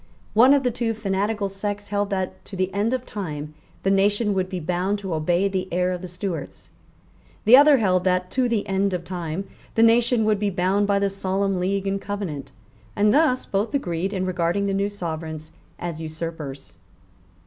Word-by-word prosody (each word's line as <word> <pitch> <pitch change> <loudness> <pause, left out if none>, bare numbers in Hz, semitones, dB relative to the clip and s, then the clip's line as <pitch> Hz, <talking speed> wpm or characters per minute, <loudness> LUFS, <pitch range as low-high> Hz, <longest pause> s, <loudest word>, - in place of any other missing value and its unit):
One 255 +6 +7
of 280 - +1
the 250 - +1
two 225 -1 -1
fanatical 205 0 -1
sects 205 +1 -4
held 205 0 0
that, 190 -2 -3
to 195 - -8
the 185 0 -1
end 205 +4 +1
of 255 -1 -2
time, 155 -7 -5 0.3
the 195 - +2
nation 205 +2 +2
would 185 -1 -1
be 185 -2 -3
bound 180 +4 -1
to 195 -4 -4
obey 175 +5 +1
the 190 -1 -2
heir 180 +1 +1
of 180 -1 -4
the 185 - -6
Stuarts; 175 -4 -6 0.7
the 225 +4 +9
other 285 +1 +7
held 185 -5 +2
that, 180 0 +1
to 255 -2 +1
the 225 -3 0
end 195 -1 +1
of 175 - -4
time, 175 0 -4 0.3
the 225 - +5
nation 230 0 +4
would 215 -2 +2
be 205 -1 +1
bound 190 +2 +1
by 200 -1 +3
the 200 0 +2
Solemn 195 0 -1
League 195 +2 -1
and 195 0 -1
Covenant; 180 -10 -5 0.4
and 210 0 +3
thus 285 -3 +3
both 205 +7 -1
agreed 180 -7 -1
in 190 -2 -2
regarding 180 +2 0
the 200 - 0
new 200 +1 0
Sovereigns 160 -4 -5 0.3
as 170 -2 -5
usurpers. 155 -3 -6
195 Hz, 190 wpm, -23 LUFS, 180-205 Hz, 0.7 s, the